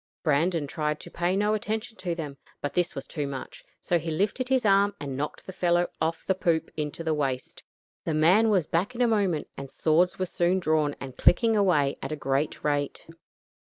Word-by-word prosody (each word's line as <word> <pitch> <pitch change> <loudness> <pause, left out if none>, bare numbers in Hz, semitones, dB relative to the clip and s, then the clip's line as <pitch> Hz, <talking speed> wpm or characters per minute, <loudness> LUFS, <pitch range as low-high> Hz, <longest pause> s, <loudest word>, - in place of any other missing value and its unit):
Brandon 160 +1 +2
tried 150 +1 -2
to - - -11
pay 175 +2 0
no 210 +2 +2
attention 220 +1 -3
to 175 -3 -3
them, 150 -4 -5 0.2
but 145 - -3
this 175 -1 0
was 135 - -5
too 150 -4 -4
much, 135 -2 -7 0.2
so 175 - +1
he 165 +1 -5
lifted 205 +10 -1
his 260 -3 +2
arm 200 0 +4
and 140 -2 -4
knocked 145 +3 -4
the 190 - -8
fellow 175 -1 +2 0.2
off 165 +1 -1
the 190 - +2
poop 170 -3 0
into 150 +1 -4
the 160 -1 +1
waist. 135 -4 -3 0.4
The 160 - -1
man 185 +9 +5
was 190 -7 +3
back 185 - -1
in 240 - -2
a - - +4
moment, 195 -9 +1
and 140 -1 -7
swords 165 +6 +2
were 185 - 0
soon 175 +1 +1
drawn 155 -4 +1
and 130 -2 -7
clicking 225 +5 +4
away 175 -9 +2
at 135 - -5
a - - -1
great 140 0 -1
rate. 145 -1 -1
165 Hz, 205 wpm, -27 LUFS, 150-190 Hz, 0.4 s, man